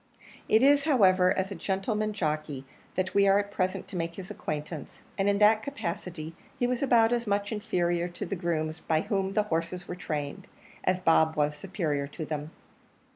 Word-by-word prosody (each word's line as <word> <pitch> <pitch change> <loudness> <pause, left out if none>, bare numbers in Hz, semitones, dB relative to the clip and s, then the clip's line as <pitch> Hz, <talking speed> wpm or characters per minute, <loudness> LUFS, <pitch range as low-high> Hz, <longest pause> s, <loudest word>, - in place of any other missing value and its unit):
It 220 +3 +5
is, 285 0 +5
however, 185 -10 +5
as 190 +1 -1
a - - -2
gentleman 200 +4 -1
jockey 155 -7 -2 0.3
that 185 0 -1
we 200 0 +4
are 195 0 +6
at 205 0 -1
present 185 -2 -1
to - - -8
make 170 -1 -2
his 190 -1 -8
acquaintance, 150 0 -6
and 195 0 +1
in 200 - +2
that 215 +1 +5
capacity 180 - -5 0.2
he 250 - +1
was 250 0 0
about 240 -4 +4
as 235 -1 -1
much 205 +1 0
inferior 175 -5 0
to 175 +3 -6
the 195 - -3
grooms 160 -3 -2
by 160 -1 +1
whom 195 0 -1
the 210 - +3
horses 175 -1 -3
were - - -4
trained 150 -5 -4 0.4
as 185 0 +2
Bob 160 -2 +4
was 150 -1 +1
superior 150 -4 -2
to 155 +2 -6
them. 150 0 -4
185 Hz, 185 wpm, -28 LUFS, 160-205 Hz, 0.4 s, are